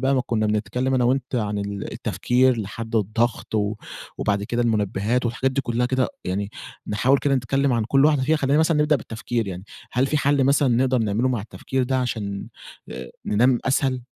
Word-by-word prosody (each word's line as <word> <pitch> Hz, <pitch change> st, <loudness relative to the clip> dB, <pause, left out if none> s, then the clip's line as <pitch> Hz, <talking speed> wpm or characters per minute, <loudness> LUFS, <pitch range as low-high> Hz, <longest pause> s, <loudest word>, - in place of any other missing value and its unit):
بقى 135 Hz, +1 st, +2 dB
ما 130 Hz, -, +2 dB
كنا 110 Hz, -2 st, 0 dB
بنتكلم 105 Hz, +5 st, 0 dB
أنا 125 Hz, -1 st, +2 dB
وأنتَ 130 Hz, +1 st, 0 dB
عن 105 Hz, -3 st, -1 dB
ال 100 Hz, 0 st, -4 dB
التفكير 125 Hz, -1 st, +1 dB
لحد 110 Hz, +3 st, -4 dB
الضغط 110 Hz, +2 st, -1 dB
و 105 Hz, 0 st, +1 dB, 0.4 s
وبعد 100 Hz, -1 st, 0 dB
كده 120 Hz, +3 st, -1 dB
المنبهات 110 Hz, +2 st, 0 dB
والحاجات 130 Hz, +3 st, 0 dB
دي 140 Hz, -, 0 dB
كلها 120 Hz, -1 st, 0 dB
كده، 130 Hz, -1 st, +1 dB, 0.2 s
يعني 100 Hz, +2 st, -2 dB, 0.4 s
نحاول 125 Hz, +7 st, +2 dB
كده 140 Hz, 0 st, +1 dB
نتكلم 135 Hz, +2 st, +1 dB
عن 115 Hz, -2 st, +1 dB
كل 135 Hz, +5 st, +3 dB
واحدة 150 Hz, -3 st, +3 dB
فيها. 155 Hz, +4 st, +2 dB
خلينا 140 Hz, 0 st, +2 dB
مثلًا 160 Hz, 0 st, +3 dB
نبدأ 150 Hz, 0 st, +3 dB
بالتفكير 115 Hz, -1 st, -3 dB
يعني، 90 Hz, 0 st, -6 dB, 0.3 s
هل 130 Hz, +2 st, +2 dB
في 150 Hz, -, 0 dB
حل 140 Hz, -1 st, +2 dB
مثلًا 140 Hz, +1 st, +3 dB
نقدر 125 Hz, +1 st, +2 dB
نعمله 110 Hz, +3 st, +1 dB
مع 125 Hz, -4 st, -1 dB
التفكير 130 Hz, +5 st, -3 dB
ده 130 Hz, +1 st, 0 dB
عشان 105 Hz, -5 st, -3 dB, 0.4 s
آآ، 65 Hz, 0 st, -7 dB, 0.2 s
ننام 120 Hz, +4 st, +3 dB
أسهل؟ 130 Hz, -1 st, +1 dB
120 Hz, 190 wpm, -23 LUFS, 105-130 Hz, 0.4 s, كل